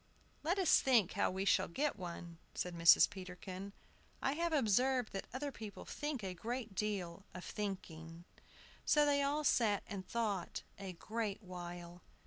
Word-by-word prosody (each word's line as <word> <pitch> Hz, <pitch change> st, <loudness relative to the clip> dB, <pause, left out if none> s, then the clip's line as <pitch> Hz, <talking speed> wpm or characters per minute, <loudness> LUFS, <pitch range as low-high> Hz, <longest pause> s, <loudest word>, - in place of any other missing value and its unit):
"Let 345 Hz, +5 st, +1 dB
us 375 Hz, -4 st, +6 dB
think 235 Hz, -9 st, +4 dB
how 200 Hz, -, +2 dB
we 190 Hz, +1 st, -2 dB
shall -, -, +4 dB
get 285 Hz, -, 0 dB
one," 170 Hz, -3 st, -7 dB, 0.2 s
said 180 Hz, -, -2 dB
Mrs. 165 Hz, 0 st, +8 dB
Peterkin. 185 Hz, +1 st, -7 dB, 0.5 s
"I 270 Hz, -, +1 dB
have 335 Hz, +3 st, 0 dB
observed 255 Hz, -2 st, +3 dB
that 195 Hz, -, -4 dB
other 280 Hz, +3 st, -3 dB
people 215 Hz, -5 st, -8 dB
think 295 Hz, -6 st, -3 dB
a 190 Hz, -1 st, -3 dB
great 230 Hz, +3 st, -4 dB
deal 195 Hz, -3 st, -2 dB
of 180 Hz, -, -6 dB
thinking." 170 Hz, -5 st, -5 dB, 0.6 s
So 295 Hz, -1 st, +5 dB
they 285 Hz, -1 st, +3 dB
all 290 Hz, +2 st, +1 dB
sat 220 Hz, -7 st, +3 dB
and 195 Hz, -2 st, -5 dB
thought 205 Hz, -3 st, -2 dB, 0.2 s
a 195 Hz, -2 st, -5 dB
great 215 Hz, +3 st, -3 dB
while. 175 Hz, -1 st, -7 dB
200 Hz, 155 wpm, -37 LUFS, 180-260 Hz, 0.6 s, Mrs